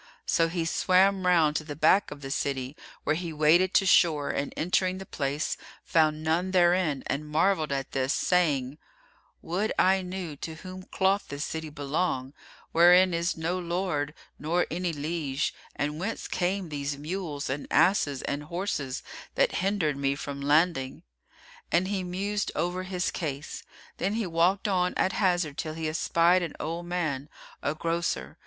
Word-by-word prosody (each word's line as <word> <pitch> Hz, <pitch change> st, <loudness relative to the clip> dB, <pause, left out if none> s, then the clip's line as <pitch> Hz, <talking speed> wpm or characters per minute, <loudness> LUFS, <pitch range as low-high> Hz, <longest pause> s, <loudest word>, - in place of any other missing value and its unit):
So 165 Hz, -, +3 dB
he 165 Hz, 0 st, -2 dB
swam 185 Hz, +2 st, +3 dB
round 160 Hz, -4 st, +4 dB
to -, -, -4 dB
the 150 Hz, -1 st, -7 dB
back 160 Hz, +7 st, +4 dB
of 145 Hz, -1 st, -9 dB
the 135 Hz, -1 st, -6 dB
city, 135 Hz, -1 st, -2 dB, 0.3 s
where 155 Hz, -, +1 dB
he 170 Hz, 0 st, -4 dB
waded 160 Hz, +5 st, +3 dB
to 195 Hz, -, +5 dB
shore 160 Hz, -6 st, +4 dB
and 140 Hz, -, -2 dB
entering 185 Hz, +2 st, +1 dB
the 190 Hz, -, -7 dB
place, 145 Hz, -1 st, -2 dB, 0.3 s
found 155 Hz, -1 st, +2 dB
none 165 Hz, +4 st, +1 dB
therein 175 Hz, -5 st, +3 dB
and 150 Hz, +2 st, -3 dB
marvelled 160 Hz, 0 st, +2 dB
at 135 Hz, -1 st, -2 dB
this, 135 Hz, 0 st, 0 dB
saying, 150 Hz, -6 st, +1 dB, 0.6 s
"Would 190 Hz, +6 st, -1 dB
I 190 Hz, +1 st, +4 dB
knew 180 Hz, -4 st, -5 dB
to 160 Hz, +3 st, -6 dB
whom 185 Hz, +2 st, -9 dB
doth 195 Hz, +1 st, +2 dB
this 145 Hz, +1 st, -4 dB
city 160 Hz, -1 st, -5 dB
belong, 145 Hz, -2 st, -2 dB, 0.4 s
wherein 180 Hz, +2 st, +6 dB
is 170 Hz, +1 st, 0 dB
no 170 Hz, +3 st, -1 dB
lord 170 Hz, -4 st, -2 dB, 0.2 s
nor 170 Hz, +4 st, +1 dB
any 175 Hz, +1 st, -1 dB
liege, 150 Hz, -2 st, -2 dB, 0.2 s
and 150 Hz, +2 st, -2 dB
whence 210 Hz, +6 st, -3 dB
came 185 Hz, 0 st, -1 dB
these 140 Hz, -1 st, -3 dB
mules 155 Hz, -1 st, -4 dB
and 140 Hz, +2 st, -3 dB
asses 145 Hz, -8 st, +3 dB
and 145 Hz, +1 st, -3 dB
horses 155 Hz, -5 st, -3 dB, 0.3 s
that -, -, +2 dB
hindered 185 Hz, -7 st, 0 dB
me 140 Hz, 0 st, 0 dB
from 140 Hz, 0 st, -6 dB
landing?" 145 Hz, -2 st, +1 dB, 0.7 s
And 175 Hz, +2 st, +3 dB
he 195 Hz, -2 st, -1 dB
mused 200 Hz, +3 st, -2 dB
over 175 Hz, +1 st, -1 dB
his 185 Hz, -1 st, -2 dB
case. 145 Hz, -2 st, -4 dB, 0.4 s
Then 200 Hz, +3 st, -1 dB
he 225 Hz, -2 st, -1 dB
walked 180 Hz, +4 st, +2 dB
on 180 Hz, -2 st, +1 dB
at 190 Hz, -, +1 dB
hazard 175 Hz, -7 st, +1 dB
till 155 Hz, -1 st, -3 dB
he 160 Hz, -1 st, -3 dB
espied 170 Hz, +3 st, +3 dB
an 170 Hz, -3 st, -4 dB
old 170 Hz, +2 st, -4 dB
man, 155 Hz, -6 st, -2 dB, 0.3 s
a 145 Hz, -, -1 dB
grocer. 165 Hz, -, -2 dB
165 Hz, 160 wpm, -28 LUFS, 145-185 Hz, 0.7 s, wherein